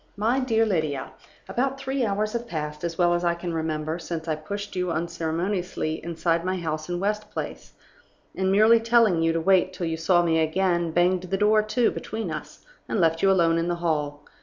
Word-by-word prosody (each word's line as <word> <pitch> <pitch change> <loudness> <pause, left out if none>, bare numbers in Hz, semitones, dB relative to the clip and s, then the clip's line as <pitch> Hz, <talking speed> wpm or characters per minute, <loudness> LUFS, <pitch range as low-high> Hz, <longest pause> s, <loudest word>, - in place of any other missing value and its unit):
"MY 230 +6 +1
DEAR 225 -4 +2
LYDIA 155 -9 -1 0.4
About 270 +2 -1
three 270 -1 -1
hours 210 0 -1
have 235 0 -3
passed, 150 -3 -5
as 170 -1 -3
well 175 -1 +3
as 175 0 0
I 170 -1 +2
can 170 0 -5
remember, 160 0 -2
since 165 -1 -5
I 160 - +1
pushed 200 +7 -6
you 180 -1 -1
unceremoniously 170 0 -2
inside 170 0 0
my 185 +1 -1
house 155 -2 -4
in 175 0 -2
West 210 +2 -2
Place, - - -6 0.6
and, 190 0 0
merely 220 +3 +6
telling 225 -6 +3
you 165 0 +3
to 165 - 0
wait 185 +2 +3
till 180 -1 -4
you 165 0 -2
saw 175 +2 +3
me 165 -1 +2
again, 175 +1 +1
banged 175 +2 +2
the 195 - 0
door 210 +1 +4
to 215 +3 +1
between 220 0 -5
us, - - -8 0.2
and - - 0
left 165 -1 +2
you 195 - +4
alone 165 -3 +3
in 165 - -1
the 175 - 0
hall. 150 -4 -2
175 Hz, 205 wpm, -25 LUFS, 165-205 Hz, 0.6 s, merely